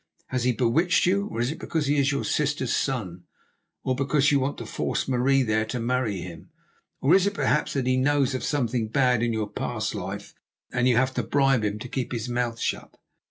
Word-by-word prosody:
Has 125 Hz, -2 st, -1 dB
he 125 Hz, -, +4 dB
bewitched 135 Hz, +10 st, +2 dB
you? 200 Hz, +3 st, +1 dB
Or 115 Hz, -, -5 dB
is 120 Hz, +3 st, 0 dB
it 160 Hz, -, -7 dB
because 160 Hz, -3 st, -2 dB
he 145 Hz, +1 st, +1 dB
is 140 Hz, +1 st, +2 dB
your 140 Hz, -, -1 dB
sister's 145 Hz, -4 st, 0 dB
son, 90 Hz, -10 st, -2 dB, 0.6 s
or 130 Hz, -, 0 dB
because 140 Hz, +2 st, +2 dB
you 140 Hz, -, +4 dB
want 135 Hz, +2 st, -2 dB
to -, -, -6 dB
force -, -, -2 dB
Marie 135 Hz, +1 st, +3 dB
there 110 Hz, -2 st, +1 dB
to 115 Hz, +3 st, -4 dB
marry 115 Hz, -5 st, -1 dB
him? 85 Hz, -2 st, -9 dB, 0.5 s
Or 140 Hz, +5 st, +4 dB
is 190 Hz, +1 st, +5 dB
it, 200 Hz, -, -2 dB
perhaps, 150 Hz, -, +1 dB
that 135 Hz, -3 st, -1 dB
he 130 Hz, 0 st, +2 dB
knows 140 Hz, 0 st, +2 dB
of 130 Hz, -, -3 dB
something 125 Hz, -5 st, 0 dB
bad 125 Hz, 0 st, +2 dB
in 120 Hz, 0 st, +1 dB
your 110 Hz, -2 st, -1 dB
past -, -, -3 dB
life, -, -, -6 dB, 0.4 s
and 125 Hz, 0 st, +1 dB
you 120 Hz, -, +4 dB
have 130 Hz, +1 st, +2 dB
to 125 Hz, -, 0 dB
bribe 135 Hz, 0 st, +2 dB
him 105 Hz, 0 st, -1 dB
to 110 Hz, -, -7 dB
keep 125 Hz, 0 st, -3 dB
his 115 Hz, -1 st, -3 dB
mouth 120 Hz, -1 st, -2 dB
shut?" -, -, -3 dB
130 Hz, 220 wpm, -25 LUFS, 115-140 Hz, 0.6 s, is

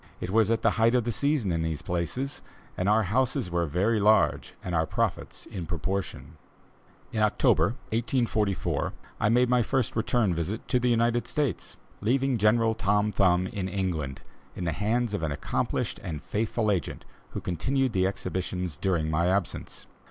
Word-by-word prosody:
It 90 Hz, -, -4 dB
was 110 Hz, 0 st, +4 dB
at 115 Hz, 0 st, +1 dB
the 115 Hz, -, +4 dB
height 115 Hz, +2 st, +5 dB
of 125 Hz, -, +3 dB
the 120 Hz, -, -1 dB
season 140 Hz, -6 st, +1 dB
in 80 Hz, -1 st, 0 dB
these 80 Hz, -2 st, -2 dB
places, 105 Hz, +11 st, -3 dB, 0.3 s
and 95 Hz, +2 st, 0 dB
our 110 Hz, +1 st, +4 dB
houses 110 Hz, -3 st, 0 dB
were 85 Hz, -1 st, 0 dB
very 100 Hz, +9 st, +1 dB
large 105 Hz, +2 st, +3 dB
and 90 Hz, -, -4 dB
our 80 Hz, -1 st, +1 dB
profits -, -, -2 dB
in 90 Hz, -4 st, -6 dB
proportion. 95 Hz, +2 st, -4 dB, 0.7 s
In 110 Hz, -, -1 dB
October, 105 Hz, +1 st, +3 dB
1844, 115 Hz, -3 st, 0 dB, 0.3 s
I 105 Hz, -, +2 dB
made 125 Hz, +2 st, +4 dB
my 125 Hz, 0 st, +3 dB
first 130 Hz, +1 st, 0 dB
return 110 Hz, -3 st, +1 dB
visit 85 Hz, +7 st, -3 dB
to 125 Hz, -, +3 dB
the 125 Hz, 0 st, +1 dB
United 120 Hz, 0 st, +2 dB
States, 150 Hz, -5 st, -2 dB, 0.2 s
leaving 130 Hz, +3 st, +1 dB
General 110 Hz, +2 st, +3 dB
Tom 105 Hz, +1 st, +1 dB
Thumb 90 Hz, -2 st, +3 dB
in 95 Hz, 0 st, -3 dB
England, 85 Hz, -8 st, -2 dB, 0.3 s
in -, -, -4 dB
the 85 Hz, -, 0 dB
hands 110 Hz, +5 st, 0 dB
of 105 Hz, -, -1 dB
an 80 Hz, -2 st, -1 dB
accomplished 70 Hz, -, -2 dB
and 80 Hz, -4 st, -5 dB
faithful 110 Hz, 0 st, 0 dB
agent, 90 Hz, -7 st, -3 dB, 0.3 s
who -, -, -3 dB
continued 130 Hz, -, 0 dB
the 95 Hz, -2 st, +2 dB
exhibitions 90 Hz, -4 st, -3 dB
during 85 Hz, -5 st, 0 dB
my 85 Hz, +3 st, +2 dB
absence. 95 Hz, 0 st, -2 dB
105 Hz, 170 wpm, -27 LUFS, 90-115 Hz, 0.7 s, height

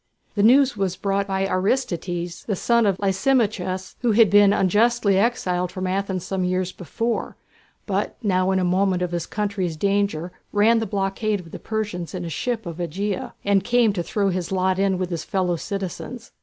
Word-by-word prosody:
The 205 Hz, -, 0 dB
news 255 Hz, +4 st, +5 dB
was 195 Hz, -3 st, -1 dB
brought 200 Hz, 0 st, -1 dB
by 195 Hz, 0 st, 0 dB
Aristides, 185 Hz, -4 st, -1 dB
the 205 Hz, -, -1 dB
son 235 Hz, +3 st, +2 dB
of 195 Hz, -2 st, +1 dB
Lysimachus, 190 Hz, -2 st, 0 dB
who 240 Hz, -3 st, +2 dB
had 225 Hz, -1 st, +5 dB
been 205 Hz, -1 st, +6 dB
unjustly 205 Hz, +1 st, +3 dB
exiled 180 Hz, -6 st, 0 dB
from 185 Hz, 0 st, -4 dB
Athens 190 Hz, -1 st, -2 dB
some 190 Hz, -1 st, -2 dB
years 185 Hz, 0 st, 0 dB
before, 225 Hz, +8 st, -3 dB, 0.5 s
but -, -, -2 dB
now 185 Hz, -2 st, +2 dB
in 190 Hz, -, +2 dB
the 185 Hz, -, +1 dB
moment 185 Hz, 0 st, +1 dB
of 180 Hz, -, -2 dB
his 170 Hz, -1 st, -3 dB
country's 200 Hz, -6 st, -2 dB
danger 195 Hz, -2 st, 0 dB, 0.2 s
ran 220 Hz, +3 st, +4 dB
the 225 Hz, -, -2 dB
blockade 200 Hz, +1 st, -1 dB
of 165 Hz, -3 st, -12 dB
the -, -, -7 dB
Persians 205 Hz, -5 st, -4 dB
in 180 Hz, -1 st, -4 dB
a -, -, -4 dB
ship 225 Hz, +7 st, -2 dB
of 170 Hz, -2 st, -6 dB
Ægina, 185 Hz, +4 st, -3 dB
and 200 Hz, -1 st, +3 dB
came 240 Hz, -1 st, +3 dB
to 180 Hz, -, -2 dB
throw 200 Hz, +3 st, 0 dB
in -, -, -1 dB
his 180 Hz, -1 st, -3 dB
lot 185 Hz, 0 st, +1 dB
with 185 Hz, -2 st, 0 dB
his 170 Hz, -, -3 dB
fellow 185 Hz, -3 st, 0 dB
citizens. 200 Hz, +6 st, -6 dB
195 Hz, 185 wpm, -23 LUFS, 180-210 Hz, 0.5 s, been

